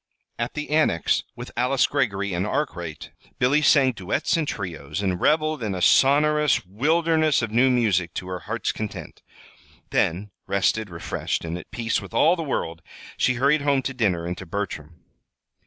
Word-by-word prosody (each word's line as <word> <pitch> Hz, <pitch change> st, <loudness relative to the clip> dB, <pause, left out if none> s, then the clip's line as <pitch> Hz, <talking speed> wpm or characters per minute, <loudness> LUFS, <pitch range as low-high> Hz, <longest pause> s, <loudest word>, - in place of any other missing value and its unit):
At 120 Hz, 0 st, -3 dB
the 150 Hz, -1 st, -5 dB
Annex, 150 Hz, -, +2 dB
with -, -, -8 dB
Alice 125 Hz, +2 st, +2 dB
Greggory 100 Hz, -8 st, -1 dB
and 90 Hz, +1 st, -1 dB
Arkwright, 85 Hz, -, -4 dB, 0.3 s
Billy 135 Hz, +5 st, +3 dB
sang 140 Hz, -3 st, +5 dB
duets 105 Hz, -, -1 dB
and 160 Hz, -3 st, -1 dB
trios, 95 Hz, -, -5 dB
and 90 Hz, -2 st, -1 dB
reveled 155 Hz, -2 st, +2 dB
in 105 Hz, -4 st, -2 dB
a -, -, -3 dB
sonorous 150 Hz, 0 st, +4 dB
wilderness 155 Hz, -, +2 dB
of 110 Hz, -, -3 dB
new 125 Hz, +4 st, +4 dB
music 100 Hz, -9 st, +1 dB
to 90 Hz, -, -5 dB
her 90 Hz, -1 st, -4 dB
heart's 105 Hz, +4 st, -3 dB
content. 110 Hz, -1 st, -7 dB, 0.7 s
Then, 95 Hz, +5 st, 0 dB, 0.2 s
rested, 100 Hz, +2 st, 0 dB
refreshed, 85 Hz, 0 st, -3 dB
and 80 Hz, +1 st, -4 dB
at 90 Hz, -, -9 dB
peace 115 Hz, -1 st, -1 dB
with -, -, -10 dB
all 165 Hz, +8 st, +5 dB
the 170 Hz, -, -4 dB
world, 85 Hz, -, -3 dB, 0.3 s
she 130 Hz, -, +1 dB
hurried 140 Hz, +4 st, +2 dB
home 140 Hz, -2 st, +1 dB
to 135 Hz, -, -3 dB
dinner 95 Hz, -9 st, 0 dB
and 90 Hz, +1 st, -3 dB
to -, -, -9 dB
Bertram. 85 Hz, -4 st, -5 dB
115 Hz, 170 wpm, -24 LUFS, 95-145 Hz, 0.7 s, sang